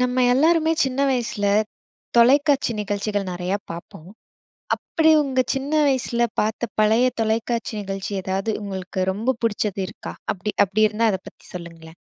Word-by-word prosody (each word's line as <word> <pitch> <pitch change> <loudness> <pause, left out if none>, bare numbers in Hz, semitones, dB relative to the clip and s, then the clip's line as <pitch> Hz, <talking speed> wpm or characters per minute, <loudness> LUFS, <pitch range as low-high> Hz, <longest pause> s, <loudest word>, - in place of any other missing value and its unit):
நம்ம 250 0 +1
எல்லாருமே 320 +4 +3
சின்ன 265 -1 -1
வயசுல, 235 -5 -1 0.7
தொலைக்காட்சி 275 +2 +4
நிகழ்ச்சிகள் 205 -1 -2
நிறைய 180 +1 -3 0.2
பார்ப்போம். 170 0 -9 0.7
அப்படி 320 -1 +2
உங்க 260 -2 0
சின்ன 270 +2 -3 0.2
வயசுல 240 -3 +1
பார்த்த 220 +2 -2
பழைய 220 +4 +4
தொலைக்காட்சி 225 +1 -1
நிகழ்ச்சி 195 0 -5
ஏதாவது 195 +3 -2
உங்களுக்கு 190 -1 -3
ரொம்ப 230 +6 -1
பிடிச்சது 205 -3 -1
இருக்கா? 210 - -8 0.2
அப்படி 205 +2 -4
அப்படி 200 +3 +1
இருந்தா, 220 +2 +1
அதைப் 190 -1 -5
பற்றி - - -25
சொல்லுங்களேன். 165 -2 -10
220 Hz, 135 wpm, -22 LUFS, 195-255 Hz, 0.7 s, தொலைக்காட்சி